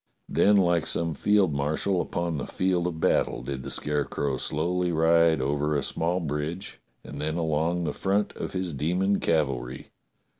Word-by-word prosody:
Then 105 - +4
like 85 -4 +2
some 85 -1 0
field 100 0 +2
marshal 75 +6 0
upon 85 -3 -2
the - - -5
field 90 -2 0
of 80 -2 -4
battle - - +1
did 65 +1 -4
the 70 - -7
Scare 75 +1 0
crow 70 -2 -2
slow^ly 85 +6 0
ride 80 -1 +4
over 75 +3 0
a 70 - 0
small 85 +3 -1
bridge 80 +3 -4 0.2
and 70 +1 -8
then 80 +1 -2
along 80 +2 0
the 75 -3 -2
front 100 +2 0
of - - -5
his 90 -3 -2
demon 90 +8 0
cavalry. 70 -5 -1
80 Hz, 165 wpm, -26 LUFS, 75-90 Hz, 0.2 s, Then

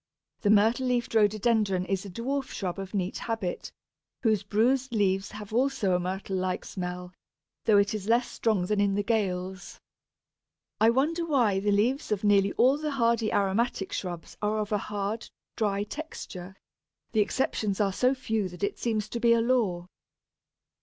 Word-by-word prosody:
The 205 - +1
myrtle 220 +5 +4
leaved 245 -2 0
Rhododendron 210 -3 +2
is 195 0 -2
a - - -7
dwarf 265 +8 -2
shrub 190 -5 -4
of 195 +1 -6
neat 185 -1 -2
habit, 225 -6 -3 0.5
whose 215 -4 +3
bruised 245 +6 +1
leaves 195 -2 +1
have 210 0 -9
also 245 -6 +1
a 180 - +2
myrtle 190 +1 -3
like 185 0 -2
smell, 180 -1 -5 0.5
though 215 -2 +5
it 200 +1 +3
is 210 -2 -4
less 235 +2 +3
strong 215 -6 0
than 205 +2 +1
in 200 -1 +2
the 205 - 0
Gales. 190 -4 -2 1.0
I 220 - +6
wonder 300 +8 +1
why 245 -12 +2
the 205 +1 -1
leaves 230 +8 +1
of 210 -1 0
nearly 200 -1 +4
all 265 +4 +4
the 305 0 -2
hardy 230 -3 +1
aromatic 200 +1 0
shrubs 175 -3 -5
are 210 +1 0
of 210 -1 -2
a 210 - +2
hard, 205 +3 -4 0.3
dry 205 -2 0
texture; 200 - -8 0.6
the 220 - +3
exceptions 210 -3 -1
are 200 -2 +2
so 255 +6 +2
few 220 -6 -2
that 180 +1 -10
it 200 - -1
seems 220 -3 -1
to 235 - -4
be 235 0 +5
a 230 - +3
law. 225 -8 +1
210 Hz, 170 wpm, -28 LUFS, 195-235 Hz, 1.0 s, I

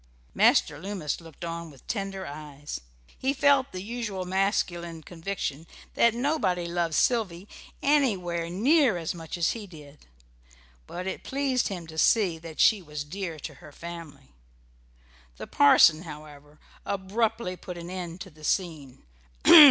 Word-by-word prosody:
Master 145 - +4
Loomis 180 -4 -3
looked 165 0 -9
on 170 0 -5
with 135 -4 -17
tender 195 -3 -3
eyes. 145 -1 -7 0.4
He 265 +1 +1
felt 280 -1 +3
the 185 0 -6
usual 210 -4 -4
masculine 175 -3 -1
conviction 165 -3 -4 0.3
that 235 -1 +4
nobody 235 - 0
loved 170 -2 -1
Sylvy 205 -6 +1 0.4
anywhere 190 - +1
near 250 - +3
as 165 +1 -3
much 165 -1 -7
as 170 - +2
he 220 -3 -6
did; 150 - -14 0.8
but 180 +1 -6
it 190 - -4
pleased 270 -2 0
him 180 -4 -5
to 160 0 -6
see 190 -7 +3
that 160 -1 -10
she 215 -3 +5
was 150 -3 -6
dear 170 +1 -5
to 150 - -6
her - - -12
family. 165 -4 -9 1.1
The - - -6
parson, 155 +2 +6
however, 150 -2 -11 0.3
abruptly 200 0 -1
put 180 0 -8
an 170 +1 -7
end 180 -1 -6
to 190 - -8
the 155 0 -18
scene. 155 -7 -2
175 Hz, 145 wpm, -27 LUFS, 160-200 Hz, 1.1 s, parson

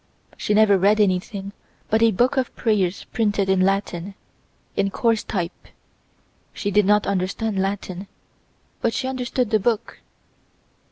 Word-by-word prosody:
She 210 - -1
never 210 -2 +5
read 205 +3 +4
anything 195 0 0 0.4
but 220 +1 +3
a 230 - +6
book 245 +7 +2
of 260 -2 -1
prayers 200 -5 0
printed 205 -4 +1
in 190 -1 +3
Latin, 195 -1 -1 0.6
in 195 - +1
coarse 225 +2 +1
type. 180 -4 -4 0.9
She 205 - -3
did 205 0 +3
not 210 0 +4
understand 200 +2 -1
Latin, 195 -1 -4 0.7
but 230 - 0
she 260 - -1
understood 250 -2 -2
the 215 - +4
book. 225 +1 -1
205 Hz, 135 wpm, -22 LUFS, 195-225 Hz, 0.9 s, a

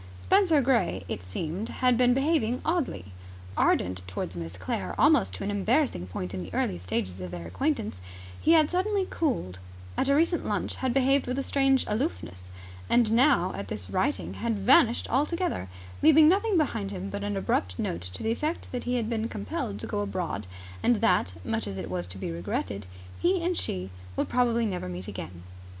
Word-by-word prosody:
Spenser 370 -7 +4
Gray, 230 - +1
it 90 - -4
seemed, 160 - -4
had 250 -1 +2
been 245 +1 +4
behaving 270 -4 +1
oddly. 305 - -1 0.5
Ardent 90 0 +2
towards 90 -1 -4
Miss 85 0 -5
Sinclair 95 0 -4
almost 90 -1 +4
to - - -6
an 205 - -1
embarrassing 210 - +1
point 90 +1 -5
in 95 - -3
the 90 +1 -8
early 90 - 0
stages 90 +1 -3
of 90 - -5
their 85 -1 -7
acquaintance, 230 - -2 0.4
he 325 - +5
had 310 -2 +5
suddenly 385 +2 +1
cooled; 160 - -1 0.4
at 270 - +1
a 280 - +5
recent 335 +3 +2
lunch - - -2
had 260 -1 0
behaved 270 +1 +3
with 250 +1 -2
a 275 - 0
strange 270 -1 +2
aloofness; 210 - -3 0.4
and 235 -3 +4
now, 255 +6 +4
at - - -5
this - - -6
writing, 295 - 0
had 230 -2 -2
vanished 240 +4 +4
altogether, 300 - 0 0.3
leaving 315 0 +7
nothing 400 +3 +3
behind 230 -10 0
him 195 0 -5
but 200 0 -4
an 205 -1 -2
abrupt 90 - 0
note 85 - -2
to 90 0 -7
the 225 - +1
effect 305 +8 -3
that 250 - -4
he 250 0 0
had 235 -3 0
been 225 0 -1
compelled 100 0 -4
to - - -4
go 205 - -2
abroad 180 - -3 0.3
and 240 - +4
that, 180 - +2
much 110 -1 -1
as 95 -1 -5
it 90 - -5
was 90 -1 -2
to 90 +2 -8
be 95 - -4
regretted, 95 +3 -3 0.3
he 360 0 +2
and 355 +1 +1
she 95 - -3 0.2
would - - 0
probably 235 -2 +2
never 180 - -3
meet 90 +1 -6
again. 90 -2 -7
220 Hz, 190 wpm, -28 LUFS, -, 0.5 s, leaving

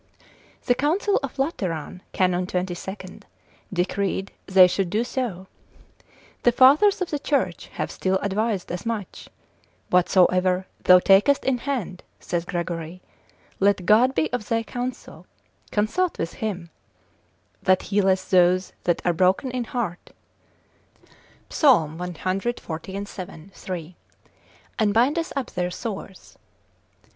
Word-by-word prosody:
The 245 - +4
council 340 +10 +1
of 275 -1 -6
Lateran, 185 - -3
Canon 180 -1 +1
22. 185 +1 -5 0.5
decreed 195 +1 -1 0.2
they 190 -1 +7
should 180 0 0
do 215 +5 0
so: 240 -7 -4 1.0
the 240 - +4
fathers 290 - +5
of 355 - -8
the 295 - -1
church 285 0 -1
have - - -3
still 190 0 0
advised 205 -1 -1
as 175 0 -4
much: 225 -5 -5 0.6
whatsoever 180 0 +3 0.2
thou 180 - +9
takest 195 +10 +4
in 260 -2 +1
hand 235 -9 -4 0.2
(saith 175 0 -3
Gregory) 170 -1 -4 0.6
let 195 -2 +2
God 240 +6 +4
be 160 +8 0
of 230 -4 -3
thy 230 0 +1
counsel, 245 +2 -6 0.4
consult 270 - 0
with 165 - -3
him; 185 -6 -5 0.9
that 185 -1 +3
healeth 190 -2 +2
those 185 0 +3
that 175 - +1
are 175 - +3
broken 185 - +2
in 250 -1 -3
heart, 225 - -4 1.4
(Psal. 170 - +4
cxlvii. 185 -1 -5
3.) 175 -3 -7 0.8
and 210 -2 +2
bindeth 290 +8 +2
up 275 -3 -3
their 180 -1 -2
sores. 195 0 -8
195 Hz, 115 wpm, -24 LUFS, 180-240 Hz, 1.4 s, thou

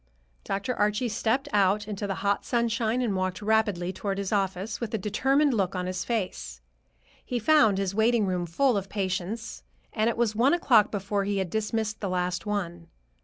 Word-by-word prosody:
Dr. 200 +6 -2
Archie 210 +4 +1
stepped 225 +5 0
out 205 +1 +2
into 205 -1 -4
the 195 - -2
hot 200 0 +1
sunshine 235 0 0
and 215 -5 0
walked 185 -1 -2
rapidly 205 -4 +1
toward 195 +1 -3
his 200 -1 -3
office, 195 +1 -1
with 230 -2 -3
a - - +1
determined 270 +8 +2
look 195 -4 0
on 180 0 -2
his 185 0 -3
face. 185 - -3 0.6
He 245 - -3
found 240 -5 +4
his 195 -1 -1
waiting 220 +1 +3
room 180 -2 -1
full 245 +7 +2
of 195 -1 -4
patients, 195 +3 -3 0.3
and 220 0 +2
it 235 - -3
was 230 -3 +1
one 255 +9 +4
o'clock 230 -11 +4
before 200 0 -2
he 200 0 -1
had 190 -3 -2
dismissed 220 0 -2
the 200 - -2
last 180 +1 -2
one. 175 -5 -3
205 Hz, 185 wpm, -27 LUFS, 190-225 Hz, 0.6 s, found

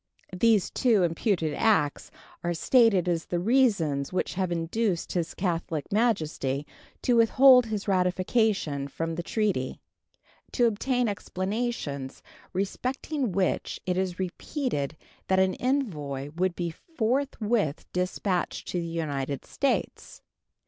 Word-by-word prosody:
These 215 0 +3
two 225 -7 +3
imputed 165 -2 0
acts 155 -8 +1 0.3
are 175 0 -1
stated 220 -2 +4
as 170 -2 0
the 175 - -2
reasons 180 - +2
which 185 - -1
have 185 -1 -1
induced 175 +3 -1
His 170 -2 -2
Catholic 170 -3 -2
Majesty 155 - 0 0.4
to 245 - +3
withhold 250 +2 +6
his 215 -2 -3
ratification 185 - +1
from 165 +3 -3
the 170 - -3
treaty, 190 - -1 0.7
to 245 - +3
obtain 245 +3 +1
explanations 190 - -3 0.3
respecting 255 - -2
which 185 0 -1
it 180 0 0
is 185 -1 -1
repeated 185 - -3 0.3
that 190 - +2
an 190 0 +3
envoy 150 - -2
would 180 0 0
be 170 -1 -2
forthwith 230 - -1
dispatched 180 0 -1
to 180 - -1
the 170 - -3
United 145 -5 -3
States. 275 - -2
185 Hz, 120 wpm, -27 LUFS, 165-230 Hz, 0.7 s, withhold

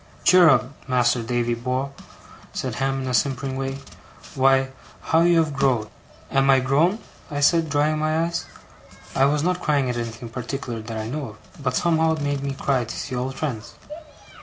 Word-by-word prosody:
'Cheer 180 -2 +7
up, 125 -2 +3 0.2
Mas'r 125 -1 +2
Davy 120 0 -1
bor'!' 130 +3 -2 0.6
said - - -3
Ham, 135 0 -1
in - - -4
his 125 -1 +3
simpering 135 -1 -3
way. 135 0 -3 0.6
'Why, 135 0 +3 0.3
how 160 - +2
you 170 0 +4
have 160 -3 +2
growed!' 130 -6 +1 0.4
'Am 135 0 +3
I 135 -1 +6
grown?' 145 +10 +2 0.3
I 145 -2 -3
said, 160 +2 +3
drying 150 +1 +1
my 155 +1 +1
eyes. 170 0 -2 0.7
I 135 - +4
was 145 +1 +1
not 180 +1 0
crying 140 -6 +1
at 120 - -4
anything 115 0 -5
in - - -21
particular 125 -2 -4
that 110 0 -6
I 110 0 -4
know 145 +4 -4
of; - - -12 0.2
but 130 -2 -1
somehow 160 -1 +2
it 155 - -6
made 145 -1 -1
me 140 -1 -3
cry, 135 -2 0
to 115 - -7
see 130 - -4
old 130 +2 -3
friends. 125 -8 -4
135 Hz, 190 wpm, -23 LUFS, 125-150 Hz, 0.7 s, Cheer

